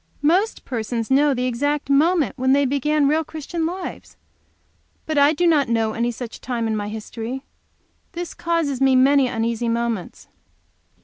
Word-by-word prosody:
"Most 370 +9 +1
persons 230 -1 -3
know 280 +1 +4
the 250 0 -1
exact 285 +4 -1
moment 305 +3 +2
when 260 0 +2
they 280 0 +3
begin 285 +2 +1
real 310 +3 +2
Christian 320 +2 -4
lives. 360 +1 -7 0.9
But 310 -2 0
I 285 +1 +6
do 350 +3 0
not 300 -7 +3
know 225 -1 +1
of - - -7
any 235 +1 +1
such 235 -1 -7
time 240 -2 -2
in 220 -1 -1
my 205 -1 -3
history. 225 +4 -6 0.7
This 350 -1 -5
causes 330 -6 -1
me 265 -1 +4
many 270 +1 +5
uneasy 230 0 -1
moments." 230 -5 -3
270 Hz, 165 wpm, -22 LUFS, 235-305 Hz, 0.9 s, I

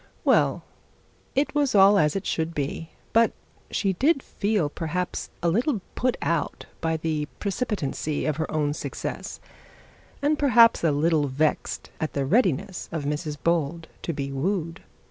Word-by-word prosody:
Well, - - +3 0.7
it 280 +2 +1
was 290 -5 +1
all 200 +1 +7
as 150 -1 +2
it 195 - -2
should 165 0 -1
be, 150 +3 -3 0.2
but 230 0 +4 0.4
she 195 -2 0
did 275 - +2
feel 205 -6 0
perhaps 170 +4 -3
a - - +3
little 230 - +1
put 250 0 0
out 165 -2 -1 0.2
by 160 -1 0
the 155 -2 -2
precipitancy 195 - -2
of 155 -2 0
her 160 - -2
own 150 -2 0
success; - - -5 0.8
and 295 +1 +1
perhaps 240 -8 +6
a 165 - +4
little 150 0 +2
vexed 145 +3 -1
at 155 - -2
the 140 -1 0
readiness 190 - +1
of 160 -3 -3
Mrs 150 +1 -2
Bold 165 -1 0
to - - -2
be 140 -3 -4
wooed. 165 +3 -2
165 Hz, 150 wpm, -25 LUFS, 150-205 Hz, 0.8 s, all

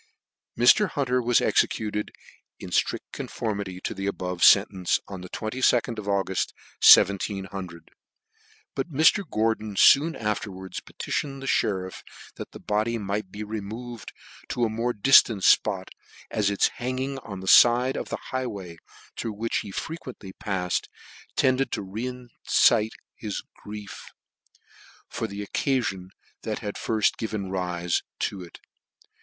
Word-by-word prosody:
Mr. 180 - +5
Hunter 125 -4 0
was 120 0 +3
executed, 105 -1 0 0.5
in - - -9
ftrict - - +1
conformity 100 -4 -4
D - - -2
the 95 +1 -4
above 90 -2 -3
fcntence, 95 -1 +5
on 95 -2 -7
the 90 - -9
2 - - -6
id 110 +4 -3 0.4
of 105 - -8
Auguff, 95 -2 0 0.3
1700. 95 -3 +4 0.8
BijtMr. 155 +6 +2
Gordon 110 -1 -1
foon 155 +10 +6
afterwa 100 -3 -4
ds - - -4
p - - -18
tition 135 -2 -3
cdthe - - -10 0.2
mtriff, 95 -2 -3 0.4
that - - -7
the - - -10
body 110 +3 -1
might 100 -1 -3
be 105 +3 -7
removed 110 +3 -7 0.4
to 120 - -1
a - - -1
more 115 +3 -1
diitant 110 -3 +5
fpot, - - +3 0.4
as 105 -2 +1
its 100 - +2
hanging 130 +2 -3
on 100 -6 -8
the 95 - -8
fide 120 +5 +6
of - - -4
the - - -3
high 130 0 -1
way, 95 -7 -8 0.4
through 115 - -4
which 115 +3 -2
he 105 - -4
frequently 125 - -7
pafled, 95 -4 -2 0.5
tended 130 +1 +2
to - - -2
re 125 +6 -6 0.2
excite 110 -1 +4 0.2
his 105 -3 -5 0.2
grief 105 -1 -9 1.0
frr 115 - -3
the 100 +1 -6
occafion 105 -7 -1 0.3
that 110 -2 -3
had 105 -2 -5
firft 110 -2 0
given 105 -4 -3
rife 90 -2 -1 0.2
to 95 - -3
it. 85 -2 -11
105 Hz, 140 wpm, -26 LUFS, 95-120 Hz, 1.0 s, foon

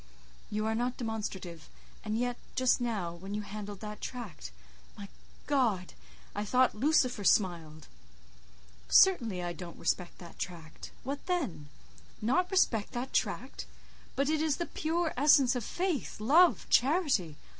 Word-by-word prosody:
You 215 +1 -2
are 220 - 0
not 245 +2 -1
demonstrative, 190 -8 -5 0.3
and 215 0 -2
yet, 245 +1 -1 0.2
just 255 0 +3
now—when 195 -4 -3
you 210 - -3
handled 205 -1 -7
that 210 -1 -7
tract—my 65 - -9 0.4
God! 230 -11 +1 0.4
I 205 - -2
thought 255 +4 +3
Lucifer 255 -2 +2
smiled." 165 -7 +1 1.0
"Certainly 230 - +5
I 175 0 -3
don't 170 -1 -9
respect 180 -2 -2
that 170 -2 -13
tract—what 180 - -7
then?" 190 - -2 0.5
"Not 350 +12 +1
respect 245 - +1
that 250 +2 -4
tract? - - -2 0.5
But 275 +1 +1
it 310 0 +1
is 310 -3 +1
the 345 - -2
pure 330 +1 -1
essence 275 -2 +5
of 245 - -2
faith, 350 - -2
love, 320 +11 +5
charity! 260 - +2
220 Hz, 130 wpm, -31 LUFS, 185-275 Hz, 1.0 s, Certainly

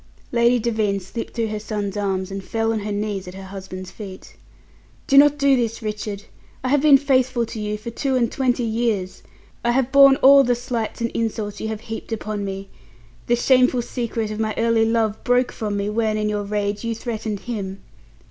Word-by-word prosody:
Lady 235 +1 +4
Devine 220 -4 0
slipped 195 +5 -7
through 230 -2 -1
her 215 0 -3
son's 205 -2 -4
arms 195 -2 -2
and 195 0 -5
fell 225 +2 -1
on 220 - -1
her 210 0 -4
knees 205 -2 -3
at 180 - -8
her 195 - -8
husband's 190 -1 -8
feet. 195 -3 -10 0.7
"Do 275 - +1
not 290 +1 +7
do 280 -1 +4
this, 230 -2 -2
Richard. 210 -1 -4 0.4
I 255 - -1
have 285 +1 +3
been 295 -2 +7
faithful 260 -3 +1
to 220 - -7
you 210 0 -2
for 225 +2 -7
two 265 +3 -1
and 235 -2 +1
twenty 255 -2 0
years. 220 -5 -1 0.4
I 240 0 +2
have 265 0 +1
borne 275 -1 +8
all 275 +1 +7
the 245 -1 +2
slights 240 -2 -4
and 230 - -1
insults 215 -2 -3
you 220 - -2
have 220 -1 -4
heaped 225 0 -7
upon 215 -2 -3
me. 195 0 -6 0.6
The 240 - +4
shameful 255 0 +3
secret 230 -3 -3
of 215 - -5
my 215 -1 -1
early 230 -1 +3
love 225 -2 0
broke 245 0 +2
from 210 -3 -3
me 200 0 -1
when 215 0 0
in 210 0 0
your 205 -1 -2
rage, 205 0 -2
you 230 -1 -2
threatened 220 -3 -4
him. 200 -5 -5
225 Hz, 205 wpm, -22 LUFS, 205-240 Hz, 0.7 s, borne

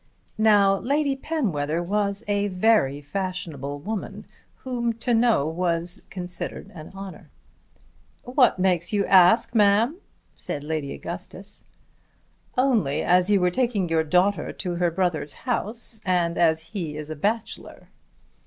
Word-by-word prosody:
Now 200 -3 +5
Lady 280 +1 0
Penwether 175 - -2
was 200 +2 -1
a 205 0 +1
very 185 -8 +2
fashionable 155 -4 -4
woman 215 +4 -5 0.4
whom 240 -3 -1
to 235 +2 -2
know 230 -9 +3
was 170 +1 -1
considered 180 -1 -5
an 155 -3 -10
honour. 195 -1 -9 0.9
"What 250 -3 +3
makes 180 -2 +1
you 205 -2 +1
ask, 190 +6 +5
ma'am?" 220 - +3 0.4
said 145 - -5
Lady 150 -2 -3
Augustus. 185 +3 -8 0.9
"Only 235 - +2
as 180 +2 +3
you 205 -1 +4
were 180 0 +2
taking 215 -5 0
your 160 -1 +2
daughter 180 +2 +1
to 180 -3 -4
her 175 0 +2
brother's 170 -4 -1
house, 230 -2 -4
and 175 -2 +1
as 160 -2 +3
he 165 -7 -4
is 155 0 -6
a - - -4
bachelor." 215 +9 -3
190 Hz, 130 wpm, -24 LUFS, 170-220 Hz, 0.9 s, Now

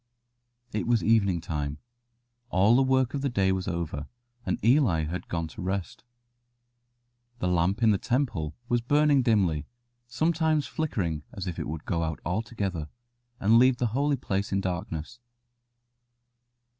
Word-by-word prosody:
It 105 -1 -2
was 120 -2 +2
evening 100 -6 +3
time. 75 -3 -3 0.7
All 100 +4 +4
the 135 - +5
work 130 -1 +2
of 140 - -2
the 140 - 0
day 95 -5 +2
was 95 -1 -2
over, 85 -5 -3 0.4
and - - +1
Eli 115 - +4
had 85 +4 -4
gone 85 -1 -2
to - - -9
rest. 95 +2 -3 1.3
The 90 - -1
lamp 90 +6 +1
in 110 - +6
the 100 - +1
temple 115 - -1
was 120 0 +1
burning 145 +2 +3
dimly, 95 - +1 0.4
sometimes 160 +2 +1
flickering 90 - -2
as 95 - -6
if 90 -3 -4
it - - -3
would 80 +1 -6
go 85 -2 -1
out 80 -1 -2
altogether, 95 -4 -2 0.5
and 110 +4 +5
leave 130 0 +5
the 120 - +1
holy 140 +2 +2
place 100 -4 -2
in 95 - +1
darkness. 90 +2 -4
100 Hz, 150 wpm, -27 LUFS, 85-125 Hz, 1.3 s, in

